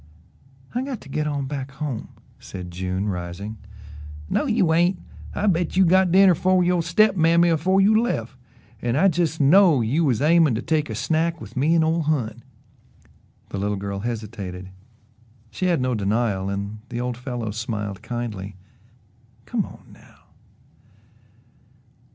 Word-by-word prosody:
"I 245 - -1
got 260 -4 -4
to - - -14
get 150 +2 -1
on 140 -2 -2
back 135 -1 -5
home," 135 -4 -4 0.3
said 90 -2 -8
June, 95 +3 -3
rising. 95 +3 -5 0.7
"No 300 - +1
you 205 -9 +2
ain't 175 +3 +3 0.4
I 210 - -1
bet 175 -2 +1
you 190 - +6
got 185 +1 +4
dinner 190 0 +6
fer 185 +2 +2
yo' 175 -1 +2
step 190 +5 +3
mammy 170 0 +4
afore 175 +4 +2
you 215 +3 +5
left, 125 - -2 0.5
an' 120 0 -1
I 190 +6 +4
jes' 165 -2 0
know 160 0 +5
you 135 +9 +1
was 130 -8 +1
aimin' 155 -3 +4
to 115 - -2
take 155 -3 0
a 110 - -4
snack 160 +7 0
with 110 -2 -11
me 150 +6 +2
an' 165 - +4
ole 165 +1 +1
Hon." 125 -8 -1 1.1
The 100 - -4
little 105 +1 -1
girl 100 0 -4
hesitated 105 -5 -6 0.8
she 185 - -2
had 175 -4 +2
no 125 0 0
denial 100 -2 0
and 100 +2 -4
the 120 - -4
old 125 0 -2
fellow 120 -3 -5
smiled 105 -2 -4
kindly. 105 -5 -5 0.9
"Come - - -2
on, - - -14
now." - - -20
135 Hz, 155 wpm, -23 LUFS, 110-170 Hz, 1.1 s, you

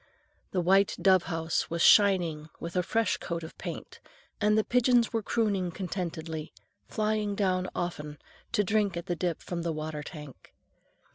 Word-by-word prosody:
The 185 - 0
white 195 +3 +3
dove 185 -2 +4
house 165 0 -1
was 170 0 0
shining 175 -7 +4
with 170 +1 -6
a 180 - +3
fresh 225 +3 0
coat 170 -1 -4
of 160 - -9
paint, - - -7 0.4
and 210 +1 +3
the 215 - +3
pigeons 245 -1 +3
were 225 - +1
crooning 200 -4 0
contentedly, 165 -3 -5 0.4
flying 215 -1 -1
down 185 -2 0
often 150 -4 -4 0.4
to 210 -3 +3
drink 205 -2 +1
at 170 - -5
the 175 - -1
drip 170 -1 -2
from 175 -1 -4
the 170 0 -1
water 155 -1 -4
tank. 150 -3 -11
180 Hz, 160 wpm, -29 LUFS, 165-205 Hz, 0.4 s, dove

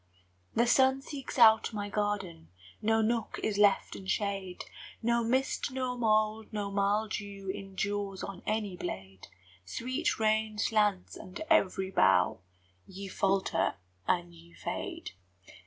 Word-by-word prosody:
The 235 - +4
sun 265 +2 +4
seeks 275 -2 -7
out 225 -1 +6
my 205 -1 -3
garden, 200 -6 -2 0.3
No 225 +1 +3
nook 230 0 -1
is 205 -2 0
left 205 -1 +3
in 190 - -9
shade, 195 -2 -2 0.4
No 235 0 +2
mist 260 +5 0
nor 255 -1 -2
mould 215 -2 +1
nor 205 -2 -3
mildew 200 -1 -1
Endures 195 0 -3
on 195 -2 -6
any 210 -3 -1
blade, 95 - -7 0.4
Sweet 255 - -2
rain 215 0 +1
slants 210 -3 +1
under 185 +11 -7
every 190 0 +3
bough: 90 - +4 0.5
Ye 195 +1 -8
falter, 195 0 +1 0.3
and 175 -1 0
ye 170 0 -17
fade. - - -5
205 Hz, 125 wpm, -31 LUFS, 190-220 Hz, 0.5 s, out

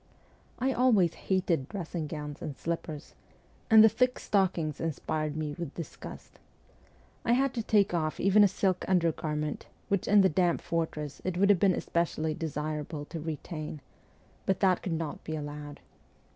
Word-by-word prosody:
I 265 +1 +1
always 220 -10 +4
hated 175 -7 0
dressing 170 -5 -4
gowns 150 0 -6
and 145 - -5
slippers, 165 -2 -4 0.6
and 220 -2 +9
the - - +9
thick 250 +4 +2
stockings 180 -7 0
inspired 155 -1 -2
me 155 -2 -2
with 170 -5 -5
disgust. 165 -4 -9 0.8
I 235 - +3
had 265 +1 +2
to 235 - -1
take 210 -4 +3
off 155 -2 -1
even 195 +2 +5
a - - +7
silk 190 -1 0
undergarment, 155 -4 0 0.2
which 200 -2 0
in 205 0 +6
the 190 - +6
damp 175 0 +2
fortress 155 -3 -3
it 185 -1 -2
would 200 +2 +5
have 195 - +3
been 190 -1 +4
especially 160 -2 -1
desirable 150 -1 -4
to 165 +2 -6
retain, 155 0 -5 0.7
but 190 -1 +2
that 185 -3 +3
could 180 - -3
not 160 -2 -4
be 160 - -4
allowed. 145 -1 -7
165 Hz, 160 wpm, -29 LUFS, 155-195 Hz, 0.8 s, and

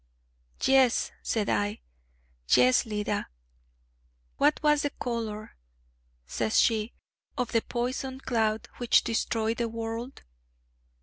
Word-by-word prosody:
'Yes,' 265 -3 +4
said 215 -3 -1
I, 205 +1 0 0.7
'yes, 125 - +5
Leda.' 210 -1 -2 1.1
'What 295 +2 +3
was 300 -1 +4
the 290 - 0
color,' 225 -5 -5 0.7
says 110 - 0
she, 220 0 +2 0.4
'of 250 -2 -1
the 230 - +2
poison 255 +3 -3
cloud 220 -4 0
which 240 -1 +4
destroyed 225 0 -1
the 235 -1 -1
world?' 230 +3 -5
230 Hz, 105 wpm, -28 LUFS, 215-250 Hz, 1.1 s, yes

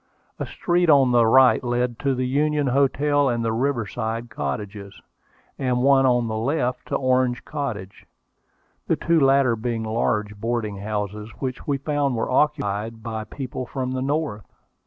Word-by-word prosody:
A - - -3
street 175 -1 0
on 135 -4 +5
the 120 -2 +4
right 130 +3 +5
led 120 -1 -1
to 140 -2 0
the 130 0 -1
Union 145 +3 +1
Hotel 140 +2 +2
and 120 -1 -1
the 110 - 0
Riverside 115 -2 -2
Cottages, 100 +5 -5 0.6
and 125 -2 0
one 135 -1 +5
on 120 -2 +2
the 110 0 -3
left 125 0 -1
to - - -2
Orange 130 -2 +1
Cottage, 120 -11 -5 0.8
the - - +2
two 170 -1 +2
latter 135 -3 +4
being 115 0 -3
large 105 -2 -1
boarding 115 -3 -2
houses, 105 +1 -4
which 130 -2 -5
we 140 -2 +1
found 140 -1 -1
were 115 - -2
occupied 115 -6 0
by 110 -1 -4
people 130 +1 -6
from 130 -1 -3
the 130 0 -2
North. 140 - -2
125 Hz, 155 wpm, -23 LUFS, 110-140 Hz, 0.8 s, on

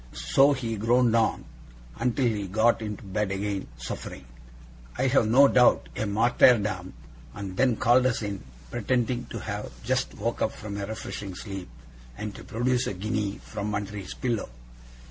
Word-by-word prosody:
So 140 +2 +7
he 115 -4 -3
groaned 115 +2 +3
on, 115 - +1 0.5
until 125 +2 +1
he 110 -3 +1
had 95 -2 -6
got 115 +3 +3
into 105 -2 -5
bed 100 +1 -1
again, 100 0 -2
suffering, - - -7 0.7
I 130 - +1
have 130 -4 +3
no 135 +5 +7
doubt, 125 -2 +4
a 110 - -2
martyrdom; 105 -3 +3 0.4
and 95 -2 -6
then 125 +2 +3
called 125 +3 +4
us 115 -3 -1
in, 100 -2 -4 0.3
pretending 125 - 0
to - - -6
have - - -5
just - - -1
woke - - -3
up - - +1
from 100 -1 -7
a 100 -1 -4
refreshing 105 -3 -6
sleep, 95 - -7 0.5
and 105 -1 -5
to - - -10
produce 125 +2 0
a - - -3
guinea 105 +1 -2
from 105 0 -4
under 100 +1 -4
his 95 -3 -6
pillow. 120 - -2
110 Hz, 165 wpm, -27 LUFS, 100-120 Hz, 0.7 s, So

